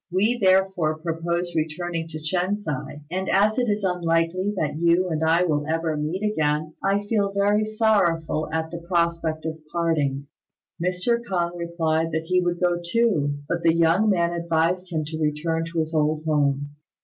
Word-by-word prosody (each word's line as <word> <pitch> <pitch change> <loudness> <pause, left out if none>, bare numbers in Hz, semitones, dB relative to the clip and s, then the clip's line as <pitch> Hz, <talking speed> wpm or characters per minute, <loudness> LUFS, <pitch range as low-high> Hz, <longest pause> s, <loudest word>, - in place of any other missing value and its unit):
We 210 +7 +1
therefore 190 -5 +2
propose 170 +2 -2
returning 165 +1 -2
to 160 -1 -7
Shen 180 +5 0
si, 205 -7 -4 0.4
and 190 +1 -2
as 210 +5 +3
it 245 -2 +1
is 205 0 0
unlikely 175 +1 +1
that 150 -2 -1
you 170 +2 +3
and 160 -1 -1
I 165 +2 +3
will 150 -4 0
ever 160 0 -1
meet 155 +7 -3
again, 155 -6 0
I 200 +1 +1
feel 205 -2 +1
very 205 +2 +2
sorrowful 190 -8 +1
at 160 0 -2
the 170 - -5
prospect 170 -2 -1
of 160 0 -4
parting." 150 -5 0 0.6
Mr. 180 +7 0
K'ung 175 -5 -1
replied 165 -1 -1
that 160 0 -1
he 180 +2 +2
would 175 -1 -1
go 175 -1 +1
too, 170 -8 +1
but 170 +2 -1
the 165 -1 +3
young 170 +6 +3
man 170 -3 +2
advised 170 +2 0
him 155 -2 -1
to 155 +1 -5
return 160 +2 0
to 170 - -6
his 160 +1 -2
old 155 0 +1
home. 145 -2 +1
170 Hz, 175 wpm, -24 LUFS, 160-185 Hz, 0.6 s, as